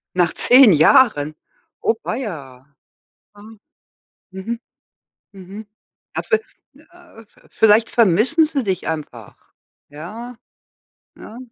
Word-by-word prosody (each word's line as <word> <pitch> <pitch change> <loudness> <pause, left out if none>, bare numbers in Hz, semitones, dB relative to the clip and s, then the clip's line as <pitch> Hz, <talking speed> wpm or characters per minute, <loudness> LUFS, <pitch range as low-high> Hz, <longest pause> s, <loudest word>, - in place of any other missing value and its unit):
Nach 175 -2 +1
10 250 -2 +5
Jahren. 155 - +3 0.5
Oh 230 - +1
weia. 145 - -7 0.7
Aha. 205 +2 -15 0.8
Mhm. 190 +5 -6 0.7
Mhm. 195 +2 -12 0.5
A - - -3
ve 440 -2 0 0.4
äh 350 -10 -19
äh, - - -20 0.2
vielleicht 220 +1 +3
vermissen 230 - +2
sie 295 -4 -3
dich 190 -4 -3
einfach. 155 -2 -7 0.5
Ja? 215 +12 -10 0.8
Ja. 225 - -12
215 Hz, 100 wpm, -19 LUFS, 175-240 Hz, 0.8 s, 10